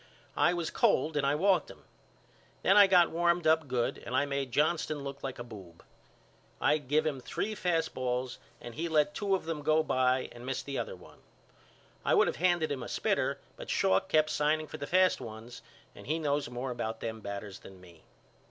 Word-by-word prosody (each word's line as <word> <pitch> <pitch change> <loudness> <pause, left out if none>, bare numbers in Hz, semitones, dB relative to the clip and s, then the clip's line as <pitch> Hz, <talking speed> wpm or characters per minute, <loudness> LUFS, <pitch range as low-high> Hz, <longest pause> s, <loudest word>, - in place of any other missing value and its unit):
I 175 - +3
was 170 -2 -3
cold 155 0 +2
and 140 -2 +1
I 140 - +2
walked 190 +4 +2
him. - - -14 0.8
Then 195 - +5
I 205 -1 +8
got 180 -3 +5
warmed 170 0 +1
up 160 -1 +3
good 125 -2 -1
and 125 - -4
I 135 - +3
made 140 -2 -3
Johnston 150 +1 0
look 140 0 -7
like 135 -2 -5
a 120 - -6
boob. 95 -8 -12 0.8
I 155 - +3
give 150 +3 0
him 145 -4 -1
three 215 +11 -3
fast 175 -5 -1
balls 125 0 -3 0.2
and 120 - -9
he 165 +7 -3
let 150 -2 +2
two 200 -2 0
of 185 - -5
them 160 -2 -3
go 155 +2 +3
by 130 -2 +1
and 120 - -11
missed 135 +1 -4
the 140 -1 -3
other - - -4
one. - - -17 0.8
I - - +3
would - - +5
of - - -2
handed 175 -2 +2
him 135 -3 -3
a 120 - -6
spitter - - 0 0.2
but - - -9
Schalk 95 0 +2
kept 155 0 +3
signing 155 +1 +1
for - - -9
fast 185 +4 +3
ones 115 +2 -9 0.3
and - - -13
he 155 +3 0
knows 145 -4 -1
more 125 +1 -4
about 115 -2 -4
them 110 -1 -4
batters 100 -1 -6
than 95 -1 -14
me. 85 -3 -17
145 Hz, 205 wpm, -30 LUFS, 125-160 Hz, 0.8 s, I